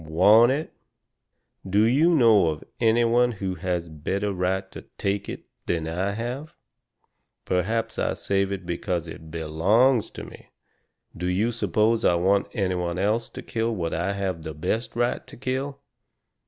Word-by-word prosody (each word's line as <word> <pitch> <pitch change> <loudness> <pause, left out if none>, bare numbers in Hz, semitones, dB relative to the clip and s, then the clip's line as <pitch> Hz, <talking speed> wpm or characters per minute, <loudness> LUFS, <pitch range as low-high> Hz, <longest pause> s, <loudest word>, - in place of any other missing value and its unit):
"WANT 105 +10 +5
it?" 150 +4 -3 0.9
"Do 100 +2 +2
you 135 +9 +4
know 110 - +5
of 75 -2 -2 0.2
any 115 0 +4
one 120 +1 +3
who 95 -3 -3
has 90 -1 -2
a 80 - -14
better 100 +7 -2
right 95 +1 -1
to - - -8 0.2
TAKE 100 0 -2
it - - -6 0.2
than 80 -2 -1
I 95 +5 -1
have? 125 +8 -5 0.9
Perhaps 110 +5 -1
I - - 0
saved 100 0 0
it 95 -2 -4
because 85 0 -2
it 80 0 -10
BELONGS 95 +11 +2
to - - -7
me - - -13 0.7
do 90 +1 -3
you 100 +6 +1
suppose 110 +1 +1
I 85 - +4
want 95 +3 +2
any 95 -3 0
one 90 -1 -2
else 105 +5 0
to - - -9
kill 115 0 -1
what 85 -4 -2
I 85 +5 -1
have 95 -4 -3
the 80 -2 -7
best 115 +10 -2
right 120 +1 -1
to - - -12
kill?" 135 +3 -3
100 Hz, 170 wpm, -25 LUFS, 90-115 Hz, 0.9 s, WANT